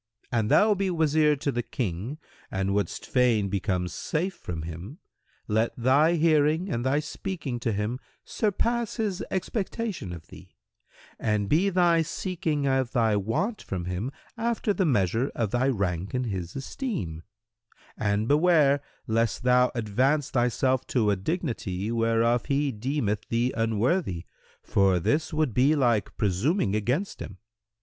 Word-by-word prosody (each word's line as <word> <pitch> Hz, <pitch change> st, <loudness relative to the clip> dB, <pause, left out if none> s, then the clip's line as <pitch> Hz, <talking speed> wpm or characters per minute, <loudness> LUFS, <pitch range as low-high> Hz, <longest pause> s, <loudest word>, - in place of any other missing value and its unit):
"—"An 115 Hz, -3 st, +1 dB
thou 210 Hz, -, +5 dB
be 195 Hz, -1 st, -1 dB
Wazir 155 Hz, -3 st, +3 dB
to 140 Hz, 0 st, -2 dB
the 120 Hz, -1 st, -1 dB
King 115 Hz, -, -4 dB, 0.3 s
and 95 Hz, 0 st, -1 dB
wouldst 100 Hz, 0 st, -2 dB
fain 120 Hz, -6 st, +2 dB
become 95 Hz, -2 st, -1 dB
safe 165 Hz, -, -2 dB
from 85 Hz, -, -6 dB
him, 85 Hz, -, -7 dB, 0.5 s
let 110 Hz, +2 st, +1 dB
thy 140 Hz, +7 st, +4 dB
hearing 160 Hz, +2 st, +2 dB
and 120 Hz, -, -1 dB
thy 135 Hz, +3 st, +2 dB
speaking 150 Hz, -4 st, -4 dB
to 115 Hz, -1 st, -1 dB
him 105 Hz, +5 st, -2 dB, 0.3 s
surpass 230 Hz, +2 st, 0 dB
his 210 Hz, -6 st, -2 dB
expectation 190 Hz, -, -3 dB
of 85 Hz, -2 st, -8 dB
thee, -, -, -14 dB, 0.6 s
and 105 Hz, -2 st, 0 dB
be 175 Hz, -, +3 dB
thy 175 Hz, -3 st, +3 dB
seeking 165 Hz, -3 st, -2 dB
of 130 Hz, -2 st, +1 dB
thy 115 Hz, -4 st, +3 dB
want 115 Hz, -, -1 dB
from 90 Hz, -3 st, -4 dB
him 90 Hz, +8 st, -3 dB, 0.3 s
after 225 Hz, -2 st, 0 dB
the 190 Hz, -3 st, +1 dB
measure 115 Hz, -, +1 dB
of 110 Hz, -4 st, -1 dB
thy 125 Hz, +2 st, +1 dB
rank 95 Hz, -5 st, -1 dB
in 125 Hz, -, 0 dB
his 95 Hz, -7 st, -4 dB
esteem, 135 Hz, -, -4 dB, 0.7 s
and 105 Hz, +1 st, 0 dB
beware 150 Hz, -2 st, +4 dB, 0.2 s
lest 115 Hz, +1 st, 0 dB
thou 125 Hz, 0 st, +4 dB
advance 130 Hz, +6 st, +1 dB
thyself 130 Hz, +1 st, +1 dB
to 110 Hz, -5 st, +2 dB
a -, -, +2 dB
dignity 110 Hz, -, -3 dB
whereof 115 Hz, +1 st, +2 dB
he 140 Hz, 0 st, +1 dB
deemeth 110 Hz, -3 st, -2 dB
thee 120 Hz, +2 st, +1 dB
unworthy, 115 Hz, -, 0 dB, 0.4 s
for 95 Hz, -2 st, +3 dB
this 130 Hz, -, 0 dB
would 155 Hz, -6 st, 0 dB
be 135 Hz, +6 st, +4 dB
like 120 Hz, -7 st, +1 dB
presuming 105 Hz, -, +1 dB
against 125 Hz, -, -1 dB
him. 100 Hz, -, -7 dB
125 Hz, 145 wpm, -27 LUFS, 105-155 Hz, 0.7 s, thou